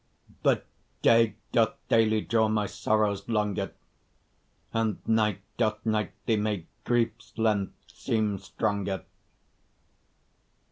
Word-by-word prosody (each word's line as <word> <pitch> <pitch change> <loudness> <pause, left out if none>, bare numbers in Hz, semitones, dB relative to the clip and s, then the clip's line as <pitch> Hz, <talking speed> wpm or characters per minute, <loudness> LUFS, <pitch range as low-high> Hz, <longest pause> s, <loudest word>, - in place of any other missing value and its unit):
But - - +2 0.4
day 115 -2 +5 0.2
doth 115 -2 +3
daily 110 -1 +4
draw 110 0 +2
my 110 -1 +1
sorrows 105 0 0
longer, 105 -3 0 1.0
And 110 -3 +1
night 105 -3 +2 0.2
doth 110 -2 0
nightly 110 +1 0
make 105 -5 -1 0.2
grief's 115 -2 0
length 105 -3 +1
seem 105 -3 -1
stronger. 100 0 -2
110 Hz, 95 wpm, -28 LUFS, 100-115 Hz, 1.0 s, day